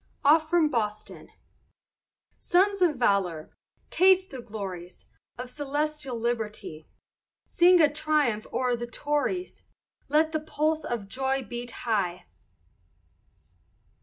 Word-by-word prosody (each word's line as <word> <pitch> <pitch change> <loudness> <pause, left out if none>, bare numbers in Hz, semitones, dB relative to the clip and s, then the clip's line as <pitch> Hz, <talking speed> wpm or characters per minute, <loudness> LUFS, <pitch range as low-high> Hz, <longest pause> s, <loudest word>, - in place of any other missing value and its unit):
OFF 310 +2 +5
FROM 335 -3 +3
BOSTON 215 -3 -3 1.1
Sons 390 +2 +2
of 340 -5 +3
valor, 195 -9 0 0.4
taste 375 0 +4
the 260 -2 -7
glories 190 -6 -8 0.3
Of 250 0 -6
celestial 290 -2 -3
liberty, 220 -9 -4 0.6
Sing 355 +1 +5
a 310 - +7
triumph 300 -8 0
o'er 250 -1 0
the 240 0 -5
Tories, 295 +8 -2 0.5
Let 310 +2 +3
the 315 - -1
pulse 310 +1 -1
of 230 -5 -4
joy 265 +4 -1
beat 240 +1 -6 0.2
high. 190 -6 -1
265 Hz, 105 wpm, -27 LUFS, 220-310 Hz, 1.1 s, a